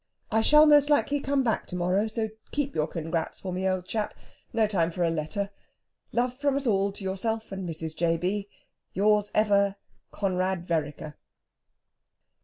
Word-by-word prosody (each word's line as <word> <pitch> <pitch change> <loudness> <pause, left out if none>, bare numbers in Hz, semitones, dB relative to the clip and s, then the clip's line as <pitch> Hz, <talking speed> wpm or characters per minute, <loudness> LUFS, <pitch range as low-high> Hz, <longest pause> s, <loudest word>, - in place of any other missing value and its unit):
"I 220 0 +3
shall 300 +6 +7
most 295 -1 +6
likely 290 -1 +2
be 280 +1 -2
back 230 -3 0
to - - -5
morrow, 180 +4 +1
so 220 0 -2 0.2
keep 285 -1 -2
your 155 0 0
congrats. 165 0 -3
for 185 -2 -5
me, 190 +1 0
old 185 -1 -1
chap. 215 +2 -3 0.4
No 225 -1 +2
time 185 -6 +1
for 175 +1 -1
a 165 - +2
letter. 180 +6 -2 0.6
Love 245 +1 0
from 280 +1 0
us 280 0 -1
all 200 -3 +2
to 200 - -6
yourself 220 +4 -2
and 190 -2 -4
Mrs. 160 -1 -5
J. 165 0 +1
B. 195 +4 -2 0.4
"Yours 210 +1 +3
ever, 200 -2 +3 0.3
"CONRAD 185 -2 -1
VEREKER. 150 -2 -3
195 Hz, 170 wpm, -27 LUFS, 175-225 Hz, 0.6 s, shall